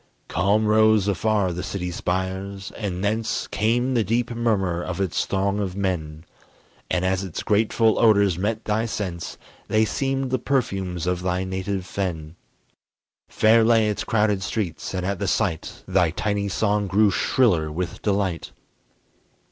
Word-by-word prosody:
Calm 100 +5 +2
rose 110 -1 +4
afar 100 -1 +1
the 90 - -4
city 90 -2 -4
spires, 95 +2 -3
and 95 -3 -4
thence 110 +2 -1
Came 120 +5 0
the 115 -3 +2
deep 120 +4 0
murmur 100 -7 0
of 90 +1 -4
its 95 -3 -1
throng 100 +1 0
of 95 -3 -3
men, 80 -6 -3 0.7
And 90 0 0
as 95 0 0
its 95 -4 -5
grateful 110 +1 +2
odors 100 -5 +4
met 105 +5 -2
thy 110 +2 0
sense, 90 -6 -4 0.3
They 110 0 +3
seemed 135 +2 -1
the 130 - +1
perfumes 95 -10 -1
of 90 0 -1
thy 90 0 -1
native 95 0 -3
fen. 85 -5 -4 0.9
Fair 110 +1 +4
lay 110 -1 +4
its 105 - -2
crowded 105 -3 +1
streets, 95 -3 -3
and 90 -1 -2
at 100 0 -2
the 100 - -2
sight 95 -5 -1
Thy 90 -3 +3
tiny 100 +4 -1
song 105 +1 0
grew 100 +2 +3
shriller 90 -8 +2
with 90 +3 -4
delight. 100 -4 -1
100 Hz, 150 wpm, -23 LUFS, 90-110 Hz, 0.9 s, rose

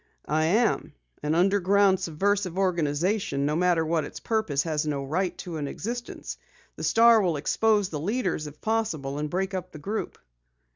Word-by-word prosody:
"I 155 +1 +1
am. 215 +8 +1 0.3
An 150 +2 0
underground, 195 +1 +3
subversive 190 +2 0
organization, 170 -3 0
no 150 +1 0
matter 175 -1 +2
what 160 -1 +1
its - - -8
purpose, 190 -11 0
has 155 -2 -1
no 140 -2 -1
right 180 +6 -1
to 175 -3 -6
an 145 -2 -3
existence. 240 - -5 0.4
The - - -7
Star 230 -1 +6
will 175 -5 +1
expose 205 +6 +2
the 150 - -4
leaders, 185 - -1
if 150 0 -12
possible, 165 -12 -1
and 150 0 -2
break 190 +3 -2
up 185 -1 -4
the - - -9
group." 205 +9 -4
180 Hz, 165 wpm, -26 LUFS, 150-205 Hz, 0.4 s, Star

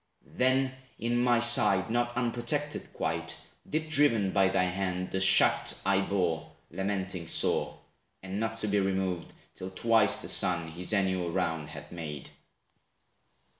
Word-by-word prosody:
Then 130 +1 +2 0.3
in 120 +1 -1
my 120 -1 +3
side, 110 -4 +4
not 120 0 -1
unprotected 125 +5 -2
quite, 80 0 -3 0.3
Deep 155 +1 -2
driven 130 -11 +2
by 95 0 +3
thy 95 -1 +1
hand, 90 0 -2
the 95 - -1
shaft 95 - +4
I 100 0 +2
bore, 90 -5 -2 0.2
Lamenting 95 -3 -3
sore; - - +1 0.5
and 95 +1 -5
not 115 0 -2
to 115 -1 +1
be 105 0 +1
removed, 95 -3 -2 0.2
Till 95 - -8
twice 110 +2 +3
the - - -5
sun 85 -4 +2
his 90 +5 -5
annual 95 -4 0
round 80 -4 -2
had - - -10
made. 75 -5 -7
95 Hz, 140 wpm, -29 LUFS, 90-115 Hz, 0.5 s, side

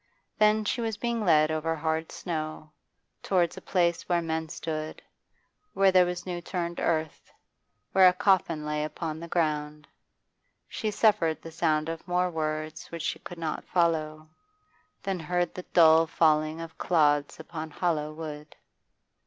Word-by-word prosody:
Then 215 0 +4
she 235 - -1
was 225 -2 -2
being 235 -1 -1
led 155 -4 +4
over 160 +1 -1
hard 160 +1 -2
snow, 155 -2 -5 0.5
towards 175 -3 +1
a - - -9
place 170 -2 0
where 175 -1 +3
men 160 -1 -3
stood, 155 -1 -5 0.7
where 195 -1 +4
there 185 -1 +5
was 180 0 -4
new 175 -2 -4
turned 175 -1 -4
earth, 160 -2 -2 0.6
where 190 -1 +7
a 180 - +5
coffin 175 -5 +2
lay 150 0 -1
upon 155 0 -4
the 170 - -7
ground. 150 -3 -1 0.8
She 220 - -3
suffered 200 -7 +2
the 165 - -8
sound 155 -2 +1
of 165 +1 -6
more 180 0 +1
words 155 -1 -3
which 170 -1 -6
she - - -2
could 175 - -10
not 160 -2 -3
follow, 155 -3 0 0.8
then 195 -2 -2
heard 175 +1 -1
the 180 - -8
dull 160 -1 +6
falling 155 0 +2
of 165 -1 -9
clods 145 -4 +2
upon 160 -1 -6
hollow 155 -1 -1
wood. 155 -1 -8
165 Hz, 155 wpm, -28 LUFS, 155-180 Hz, 0.8 s, where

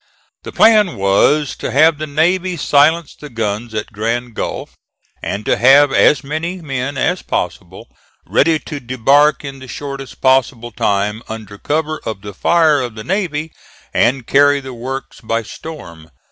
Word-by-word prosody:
The - - -9
plan 215 -5 +4
was 100 +10 +2
to - - -4
have 155 +2 +4
the 155 - -4
navy 175 +5 0
silence 150 +2 +2
the 150 - -11
guns 110 -1 -4
at 105 - -4
Grand 115 +3 -2
Gulf, - - -5 0.5
and 105 +2 -4
to - - +1
have 135 +3 +6
as 140 -1 +4
many 160 +6 -4
men 135 -3 -4
as 180 +7 0
possible 90 +1 -4 0.4
ready 160 +2 +2
to 150 -1 -7
debark 140 +5 +2
in 135 -1 -7
the 130 - -11
shortest 140 0 -7
possible 130 -2 +1
time 105 +1 -1
under 105 -2 -8
cover 155 +3 -2
of 110 -3 -5
the 105 -1 -8
fire 160 - +3
of 120 -3 -5
the 110 - -7
navy 160 - -2 0.4
and 125 +1 +1
carry 145 +2 +4
the 130 -1 -9
works 130 +2 -7
by 115 0 -2
storm. 85 - -10
135 Hz, 160 wpm, -17 LUFS, 115-155 Hz, 0.5 s, have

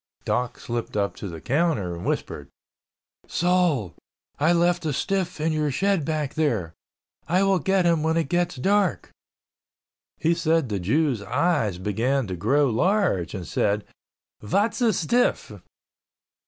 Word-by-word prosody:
Doc 125 0 -1
slipped 120 -2 -4
up 100 -1 0
to 100 - -6
the 85 -3 -7
counter 125 - 0
and 85 - -7
whispered, 70 -1 -3 0.8
"Sol, 175 - +1 0.5
I 155 +4 +3
left 175 0 +2
a 155 -2 -1
stiff 185 +2 -2
in 160 +1 0
your 155 -1 0
shed 190 +2 +1
back 150 -3 -2
there. 110 - -1 0.5
I 180 +5 +2
will 195 -1 +3
get 190 +3 +1
him 170 -2 +3
when 160 +1 +1
it 165 - 0
gets 175 +2 0
dark." 195 +7 +1 1.1
He 165 +2 +2
said 165 -4 +1
the 100 -2 -2
Jew's 125 - +1
eyes 110 - 0
began 115 +8 0
to 95 -3 -4
grow 135 +12 +2
large 175 - +1
and 90 -3 -6
said, 105 +1 0 0.6
"Vat's 205 - 0
a 235 -2 +4
stiff?" 235 +7 +1
155 Hz, 145 wpm, -24 LUFS, 105-175 Hz, 1.1 s, a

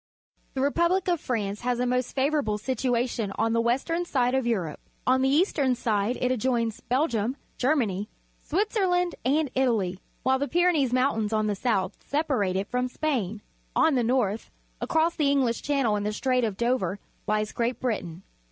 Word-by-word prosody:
— - - -41
The 260 - 0
re 280 +1 +2
public 345 +4 +1
of 345 -3 +1
France 210 -4 -2
has 245 0 0
a 250 - +1
most 250 0 -1
favourable 275 -6 +1
situation 240 -2 -1
on 225 +1 +1
the 230 - +3
western 270 +9 0
side 250 -7 +1
of 265 -2 +1
Europe. 180 -10 -1 0.3
On 260 +1 +3
the 265 - +3
eastern 285 -4 +2
side 220 0 0
it 250 - +1
adjoins 235 -2 0
Belgium, 250 -2 0 0.2
Ger 270 +5 +3
many, 210 -6 -1 0.3
Switzerland, 360 -1 +1
and 285 +2 +1
Italy, 220 -8 +1 0.2
while 265 0 +2
the 285 - -1
Ptjrenees 335 -7 +2
Mountains 245 -4 +1
on 215 0 +2
the 210 - +1
south 200 -3 0
separate 265 - 0
it 195 +1 -1
from 250 +2 -1
Spain. 235 - -2 0.3
On 320 - +4
the 250 -3 +2
north, 225 -3 0 0.3
across 325 +1 +1
the 295 -4 +2
English 260 -5 +1
Channel 275 -7 +1
and 205 - -2
the 210 - -1
Strait 255 +3 +1
of 210 -4 -1
Dover, 235 -6 0 0.3
lies 215 0 0
Great 235 0 -1
Britain. 190 -8 -3
250 Hz, 180 wpm, -26 LUFS, 215-280 Hz, 0.3 s, On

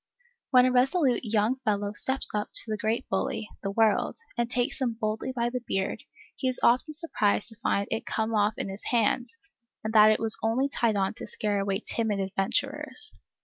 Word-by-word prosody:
When 250 -2 +6
a 255 - +3
resolute 260 +1 +2
young 220 +2 +1
fellow 205 -5 -1
steps 265 +5 +1
up 210 0 -2
to 220 - +4
the - - +1
great 225 +4 -1
bully, 245 -5 -2
the 195 - -3
World, 220 +1 +2 0.2
and 235 -1 -1
takes 245 +2 -1
him 245 -3 +1
boldly 215 +4 -2
by 240 -2 -1
the 250 0 -3
beard, 195 0 -2 0.3
he 260 - -2
is 255 - +1
often 255 +6 +3
surprised 245 -10 0
to 225 - -13
find 200 -3 0
it 225 - -3
come 220 0 -1
off 210 0 +2
in - - -3
his 195 +1 -8
hand, 240 +1 +1 0.6
and 220 0 -3
that 215 -1 +8
it 215 - +3
was 225 -1 +3
only 245 +5 +1
tied 235 -5 +1
on 195 -1 0
to - - -9
scare 210 -1 -1
away 195 +1 -1
timid 220 -4 -1
adventurers. 275 - -2
225 Hz, 195 wpm, -27 LUFS, 210-255 Hz, 0.6 s, that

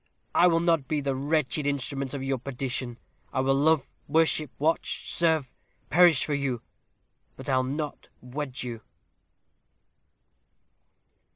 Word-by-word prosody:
I 180 - +6
will 165 -1 +3
not 165 -5 +2
be 155 - 0
the 140 -1 -1
wretched 145 +1 0
instrument 140 -1 -2
of 135 - -4
your 135 -1 -1
perdition. 125 -2 -3 0.3
I 130 - 0
will 135 +1 +3
love, 145 +1 +3 0.2
worship, 155 -1 +2
watch, 160 +3 -1
serve, 160 -6 +1 0.4
perish 175 -3 +6
for 150 - -2
you 135 -4 -1 0.7
but 130 - -9
I'll 130 -2 +3
not 145 +3 -4
wed 130 +1 -5
you." 120 -2 -6
140 Hz, 125 wpm, -27 LUFS, 130-155 Hz, 0.7 s, I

